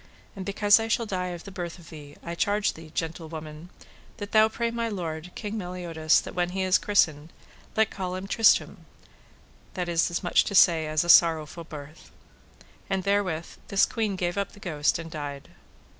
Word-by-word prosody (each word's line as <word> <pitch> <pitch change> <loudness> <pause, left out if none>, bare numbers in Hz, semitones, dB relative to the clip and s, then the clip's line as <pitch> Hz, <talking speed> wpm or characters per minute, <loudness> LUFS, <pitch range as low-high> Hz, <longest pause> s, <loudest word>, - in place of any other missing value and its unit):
And 190 -1 -7
because 205 +1 +4
I 225 - -2
shall 230 +1 0
die 185 -3 -2
of 175 -1 -6
the 200 - -10
birth 175 -2 -6
of 170 - -15
thee, 145 -2 -11
I 170 - -5
charge 205 +4 +1
thee, 160 0 -12
gentlewoman, 160 0 -6 0.5
that 205 -1 -7
thou 215 0 +6
pray 230 +1 -2
my 230 0 -2
lord, 170 -4 -5
King 215 -1 -4
Meliodas, 175 -4 0
that - - -9
when 175 -1 0
he 190 +1 -2
is 185 0 +3
christened 160 -6 +1 0.5
let 220 -1 +3
call 185 -2 -4
him 185 +1 -5
Tristram, 225 +2 +3 0.9
that 180 -2 -2
is 170 0 +1
as 175 - -3
much 175 - +3
to 200 - -3
say 165 -3 +5
as 155 +1 +1
a - - -6
sorrowful 165 -1 +4
birth. 150 0 -11 0.8
And 190 -1 -1
therewith 190 -5 0 0.2
this 195 - +4
queen 215 -3 -2
gave 180 +1 -2
up 200 - -3
the - - -15
ghost 155 -6 0
and 165 -1 -8
died. 145 -3 -6
180 Hz, 190 wpm, -26 LUFS, 160-200 Hz, 0.9 s, thou